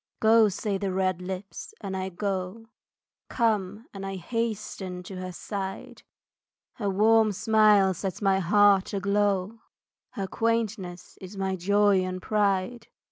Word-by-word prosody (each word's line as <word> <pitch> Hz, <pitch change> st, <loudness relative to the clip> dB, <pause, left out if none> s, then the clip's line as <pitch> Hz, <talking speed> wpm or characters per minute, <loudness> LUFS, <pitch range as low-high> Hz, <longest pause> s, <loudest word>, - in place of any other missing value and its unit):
Go, 220 Hz, -1 st, +5 dB
say 200 Hz, 0 st, -3 dB
the 195 Hz, -1 st, -2 dB
red 185 Hz, -1 st, 0 dB
lips, 190 Hz, +2 st, -7 dB
and 195 Hz, -2 st, -5 dB
I 190 Hz, 0 st, -3 dB
go, 190 Hz, +3 st, -4 dB, 0.6 s
Come, 215 Hz, -2 st, 0 dB
and 195 Hz, -1 st, -7 dB
I 195 Hz, 0 st, -4 dB
hasten 195 Hz, -3 st, -4 dB
to 190 Hz, +1 st, -8 dB
her 185 Hz, 0 st, -5 dB
side, 195 Hz, +1 st, -6 dB, 0.8 s
Her 205 Hz, -4 st, -1 dB
warm 215 Hz, +2 st, +4 dB
smile 210 Hz, -2 st, +4 dB
sets 185 Hz, 0 st, -5 dB
my 195 Hz, -2 st, +2 dB
heart 200 Hz, +1 st, +3 dB
aglow, 200 Hz, +1 st, 0 dB, 0.5 s
Her 195 Hz, -, -3 dB
quaintness 215 Hz, -5 st, -2 dB
is 190 Hz, +2 st, -9 dB
my 190 Hz, -1 st, -1 dB
joy 200 Hz, +2 st, +3 dB
and 185 Hz, 0 st, -3 dB
pride. 205 Hz, +3 st, 0 dB
195 Hz, 135 wpm, -26 LUFS, 185-210 Hz, 0.8 s, Go